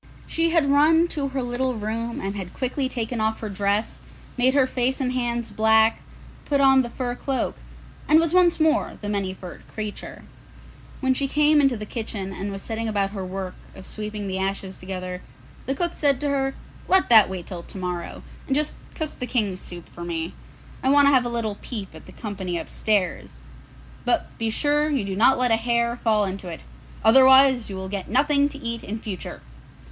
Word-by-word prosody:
She 330 0 +1
had 330 -3 +3
run 310 +4 +4
to 290 -4 -2
her 265 -1 -3
little 245 +1 -1
room 225 +2 -3
and 195 +1 -3
had 185 -3 -6
quickly 260 +1 -1
taken 235 -2 -3
off 220 0 0
her 215 - -5
dress, 200 +2 -1 0.4
made 255 +2 +3
her 275 -2 +5
face 255 0 0
and 255 -2 -1
hands 240 -2 -2
black, 220 +1 +4 0.4
put 285 -1 0
on 270 -1 +6
the 240 - -4
fur 245 0 -3
cloak, 265 +1 -2 0.5
and 310 - +6
was 330 0 +1
once 355 -2 +4
more 315 0 +1
the 205 - -6
Many 200 -2 -1
furred 180 -2 -10
Creature. 215 -1 -6 0.8
When 260 -1 +3
she 275 +2 -1
came 300 +1 +4
into 270 -4 +2
the 210 - -6
kitchen 205 -4 -4
and 200 +2 -4
was 195 0 -7
setting 225 0 -3
about 200 -2 0
her 195 -2 -5
work 185 0 -5 0.2
of 190 - -11
sweeping 210 0 -5
the 190 0 -2
ashes 190 0 -3
together, 185 -1 -5 0.5
the 270 - 0
cook 345 +4 0
said 280 -4 +2
to 290 - 0
her, 270 -1 0 0.3
'Let 380 -5 +3
that 220 -5 +8
wait 185 -2 -5
till 180 -3 -6
to 180 - -10
morrow, 180 -2 -5 0.2
and 270 - +1
just 300 +1 0 0.2
cook 315 -2 -5
the 250 - -3
King's 205 -8 -1
soup 175 -1 -7
for 175 - -10
me; 165 -1 -3 0.5
I 260 - +1
want 285 +1 +6
to 280 - +6
have 255 -2 +4
a - - -1
little 225 -3 -3
peep 205 -8 -6
at 160 - -13
the - - -11
company 190 -5 -4
upstairs; 200 +1 -1 0.7
but - - 0
be 225 -1 0
sure 295 +5 +1
that 295 - 0
you 215 - -2
do 195 -1 -3
not 235 +6 +5
let 250 -1 +2
a 225 - +5
hair 235 +1 +1
fall 215 -3 +2
into 190 -1 -5
it, 165 -2 -7 0.4
otherwise 265 0 +7
you 195 - -5
will 190 0 -5
get 195 -1 -5
nothing 285 +3 +3
to 285 - -9
eat 235 -3 -4
in 215 - -4
future! 205 -5 -7
230 Hz, 205 wpm, -24 LUFS, 195-270 Hz, 0.8 s, that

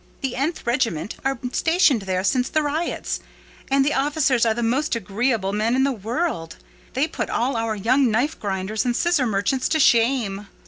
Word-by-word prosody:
The 265 -3 -2
——th 310 +5 -2
regiment 235 - -1
are 270 -1 0
stationed 320 - +3
there 185 0 0
since 250 +5 +1
the 310 - +1
riots; 305 +4 -2 0.5
and 270 0 +3
the 295 - +1
officers 270 -4 +2
are 220 - +3
the 240 - -2
most 260 +5 0
agreeable 215 -1 -1
men 220 +4 +1
in 265 - +3
the 275 - +2
world: 225 - -3 0.4
they 270 +4 +1
put - - -4
all 250 +3 0
our 225 -1 -1
young 250 +6 +2
knife 245 +8 0
grinders 200 +1 -2
and 245 -2 0
scissor 330 -6 +2
merchants 215 +5 0
to 315 - +1
shame." 230 -6 +2
245 Hz, 180 wpm, -22 LUFS, 215-275 Hz, 0.5 s, stationed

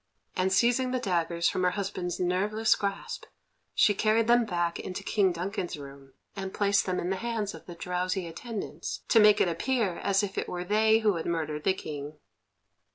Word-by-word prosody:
And, 185 +1 +1
seizing 245 +5 +3
the 255 - 0
daggers 170 -5 0
from 185 - 0
her 180 - +4
husband's 185 -2 -3
nerveless 205 +5 +2
grasp, 200 - -4 0.5
she 205 - +5
carried 220 +2 +2
them 240 0 +4
back 175 -4 -1
into 185 +1 -5
King 195 -2 +2
Duncan's 180 0 -3
room, 140 -1 -12 0.2
and 190 -1 -5
placed 200 -1 +2
them 185 -1 0
in 180 - -2
the 190 - 0
hands 225 -2 -2
of - - -12
the 175 - -8
drowsy 180 +2 -2
attendants, 210 +6 -6
to 230 - +6
make 210 -1 +6
it - - +4
appear 195 +2 0
as 200 +1 +2
if 195 -1 -2
it - - -4
were 180 0 -3
they 220 +3 +3
who 210 -5 +2
had 165 - -4
murdered 155 -3 -2
the 190 - +3
King. 150 -3 -7
190 Hz, 190 wpm, -28 LUFS, 175-215 Hz, 0.5 s, to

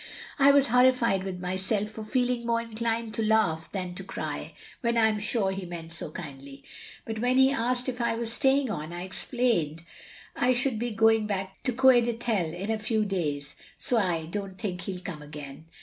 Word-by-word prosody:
I 275 0 +7
was 280 -1 +6
horrified 250 -5 +4
with 190 -2 -5
myself 190 +3 -1
for 220 0 -8
feeling 245 +1 0
more 230 0 +1
inclined 230 0 -2
to 225 - -1
laugh 215 -8 +1
than 185 -3 -4
to 195 - -6
cry, 190 - -5 0.3
when 235 -2 +1
I 225 - +5
am 215 -1 +1
sure 210 -2 +1
he 190 0 -4
meant 170 -2 -7
so 165 - -4
kindly; 140 -4 -9 0.4
but 220 -1 -4
when 250 +2 +2
he 265 0 +6
asked 250 0 0
if 250 -1 -3
I 235 -1 +1
was 230 0 0
staying 270 -1 +2
on 155 -3 -5
I 175 +1 -5
explained 185 - 0 0.5
I 250 +1 +3
should 245 -2 +1
be 240 +1 -1
going 225 -1 +3
back 190 -2 -4
to 255 - +2
Coed 250 -1 +5
Ithel 225 -8 -1
in 190 +6 -4
a 220 - -1
few 215 0 0
days, 150 -8 -2 0.2
so 245 - +1
I 175 -5 0
don't 195 +2 -5
think 180 -4 -4
he'll 185 -1 -5
come 175 -4 -6
again. 150 +1 -9
215 Hz, 195 wpm, -27 LUFS, 180-235 Hz, 0.5 s, I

